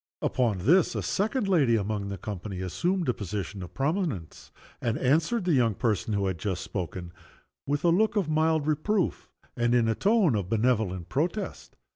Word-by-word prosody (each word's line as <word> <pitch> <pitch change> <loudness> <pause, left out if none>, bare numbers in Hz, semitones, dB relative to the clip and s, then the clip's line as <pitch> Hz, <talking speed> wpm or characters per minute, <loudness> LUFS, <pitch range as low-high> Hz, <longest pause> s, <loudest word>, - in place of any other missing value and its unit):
Upon 120 -6 +1
this, 175 +8 +4
a - - -2
second 215 +2 0
lady 145 -11 +4
among 105 -1 -2
the 100 - -4
company 100 -1 -6
assumed 175 - -1
a 125 - +2
position 100 -1 -5
of 90 - -9
prominence, 140 - -2 0.3
and 115 -1 0
answered 165 - +1
the 175 - +2
young 115 -6 +3
person 105 0 0
who 100 -1 0
had 95 -3 -2
just 95 -1 -2
spoken 90 -2 -5 0.5
with 145 +1 -1
a 175 - +4
look 215 +6 +3
of 200 -6 +1
mild 155 -1 +2
reproof, 160 +6 0 0.3
and 120 0 +2
in 120 -2 +3
a 110 - +2
tone 200 - +3
of 100 -4 -2
benevolent 110 -6 +1
protest. 175 +9 -3
120 Hz, 175 wpm, -27 LUFS, 100-170 Hz, 0.5 s, this